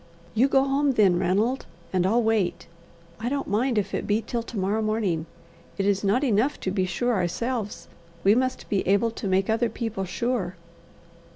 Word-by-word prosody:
"You 240 Hz, +5 st, +4 dB
go 270 Hz, -1 st, +4 dB
home 275 Hz, +1 st, +2 dB
then, 195 Hz, -6 st, +4 dB
Ranald, 205 Hz, +8 st, +1 dB, 0.3 s
and 185 Hz, 0 st, +2 dB
I'll 230 Hz, +4 st, +3 dB
wait. 220 Hz, -5 st, 0 dB, 0.5 s
I 230 Hz, +2 st, -2 dB
don't 280 Hz, +1 st, -1 dB
mind 230 Hz, +4 st, 0 dB
if 205 Hz, -, -1 dB
it -, -, -2 dB
be 210 Hz, +1 st, +2 dB
till 235 Hz, +2 st, -2 dB
to 230 Hz, 0 st, -8 dB
morrow 200 Hz, +3 st, 0 dB
morning. 210 Hz, -7 st, -1 dB, 0.5 s
It 195 Hz, -, 0 dB
is 200 Hz, 0 st, +1 dB
not 210 Hz, +7 st, +2 dB
enough 245 Hz, +2 st, +1 dB
to 185 Hz, -, -1 dB
be 190 Hz, -1 st, +1 dB
sure 245 Hz, +7 st, 0 dB
ourselves; 210 Hz, +4 st, -2 dB, 0.4 s
we 200 Hz, -, +6 dB
must 255 Hz, +2 st, -1 dB
be 200 Hz, -, +1 dB
able 200 Hz, +4 st, +3 dB
to 220 Hz, -, -5 dB
make 190 Hz, 0 st, +2 dB
other 225 Hz, +2 st, +1 dB
people 225 Hz, -5 st, -3 dB
sure." 190 Hz, -1 st, -2 dB
215 Hz, 185 wpm, -25 LUFS, 195-240 Hz, 0.5 s, we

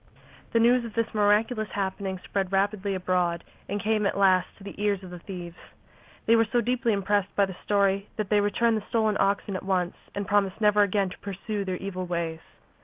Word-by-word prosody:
The 230 Hz, -, +3 dB
news 240 Hz, +2 st, +4 dB
of 230 Hz, -3 st, -8 dB
this 230 Hz, -1 st, -1 dB
miraculous 215 Hz, +1 st, +2 dB
happening 190 Hz, -1 st, -2 dB
spread 195 Hz, -2 st, -2 dB
rapidly 200 Hz, 0 st, 0 dB
abroad 180 Hz, -2 st, 0 dB, 0.3 s
and 205 Hz, -, -1 dB
came 215 Hz, -1 st, +1 dB
at -, -, -2 dB
last 190 Hz, -2 st, +4 dB
to 200 Hz, -, -14 dB
the 200 Hz, -, -7 dB
ears 200 Hz, -2 st, 0 dB
of 180 Hz, -, -9 dB
the 180 Hz, -, -8 dB
thieves. 175 Hz, -1 st, -8 dB, 0.7 s
They 230 Hz, -, +5 dB
were 225 Hz, -1 st, +3 dB
so 245 Hz, -, +3 dB
deeply 240 Hz, +1 st, +1 dB
impressed 200 Hz, -1 st, 0 dB
by 200 Hz, -, +4 dB
the 190 Hz, -2 st, -8 dB
story 200 Hz, -1 st, +1 dB
that 210 Hz, -3 st, -3 dB
they 210 Hz, -, +5 dB
returned 220 Hz, +3 st, +2 dB
the 210 Hz, -, -6 dB
stolen 220 Hz, -2 st, +2 dB
oxen 200 Hz, 0 st, +1 dB
at 185 Hz, -, -3 dB
once 185 Hz, -2 st, -1 dB, 0.2 s
and 200 Hz, 0 st, -2 dB
promised 200 Hz, -1 st, +1 dB
never 210 Hz, -1 st, +4 dB
again 200 Hz, -1 st, +1 dB
to -, -, -11 dB
pursue 200 Hz, +1 st, -4 dB
their 185 Hz, -1 st, -2 dB
evil 185 Hz, -1 st, -5 dB
ways. 170 Hz, -2 st, -2 dB
200 Hz, 205 wpm, -26 LUFS, 190-215 Hz, 0.7 s, They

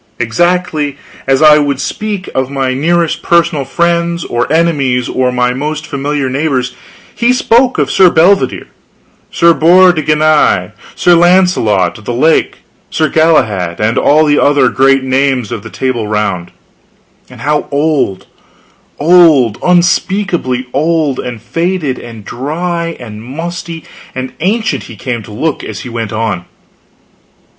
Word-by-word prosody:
Exactly 155 Hz, +4 st, -1 dB, 0.3 s
as 135 Hz, +2 st, +2 dB
I 150 Hz, 0 st, +7 dB
would 140 Hz, -2 st, -1 dB
speak 205 Hz, +1 st, -4 dB
of 130 Hz, -1 st, -1 dB
my 135 Hz, -2 st, -1 dB
nearest 165 Hz, +4 st, 0 dB
personal 170 Hz, -4 st, +1 dB
friends 170 Hz, +3 st, -1 dB
or 120 Hz, +3 st, -2 dB
enemies, 140 Hz, -7 st, +1 dB
or 130 Hz, -1 st, 0 dB
my 125 Hz, 0 st, 0 dB
most 150 Hz, +3 st, -4 dB
familiar 140 Hz, -1 st, -3 dB
neighbors, 130 Hz, -2 st, -1 dB, 0.4 s
he 235 Hz, +1 st, +1 dB
spoke 250 Hz, 0 st, +2 dB
of -, -, 0 dB
Sir 185 Hz, -2 st, +5 dB
Bedivere, 185 Hz, +5 st, +2 dB, 0.6 s
Sir 170 Hz, 0 st, +3 dB
Bors 180 Hz, +3 st, +5 dB
de 155 Hz, -, -2 dB
Ganis, 155 Hz, 0 st, +2 dB, 0.2 s
Sir 175 Hz, -, +3 dB
Launcelot 170 Hz, -, +2 dB
of 110 Hz, -, -17 dB
the 120 Hz, -, -3 dB
Lake, 160 Hz, +6 st, +1 dB, 0.3 s
Sir 155 Hz, -2 st, 0 dB
Galahad, 110 Hz, -, +1 dB
and 105 Hz, +2 st, +1 dB
all 155 Hz, +2 st, +3 dB
the 145 Hz, -1 st, +2 dB
other 140 Hz, -3 st, +3 dB
great 135 Hz, 0 st, +2 dB
names 130 Hz, -3 st, 0 dB
of 115 Hz, -3 st, -4 dB
the 110 Hz, -, -10 dB
Table 120 Hz, -4 st, -3 dB
Round 100 Hz, -5 st, -2 dB, 0.8 s
and -, -, -13 dB
how 150 Hz, 0 st, -1 dB
old, 145 Hz, -9 st, -1 dB, 0.7 s
old, 155 Hz, -, +4 dB
unspeakably 175 Hz, -6 st, 0 dB
old 155 Hz, -2 st, 0 dB
and 125 Hz, -2 st, -5 dB
faded 165 Hz, -, -2 dB
and 115 Hz, -4 st, -11 dB
dry 165 Hz, -, -4 dB
and 110 Hz, -3 st, -9 dB
musty 165 Hz, +5 st, -6 dB, 0.3 s
and 130 Hz, 0 st, -5 dB
ancient 200 Hz, -, -1 dB
he 115 Hz, -, -11 dB
came 120 Hz, +1 st, -4 dB
to 110 Hz, -, -12 dB
look 150 Hz, +8 st, -3 dB
as -, -, -7 dB
he 125 Hz, -, -8 dB
went 115 Hz, -2 st, -4 dB
on! 110 Hz, -5 st, -3 dB
145 Hz, 140 wpm, -12 LUFS, 125-170 Hz, 0.8 s, I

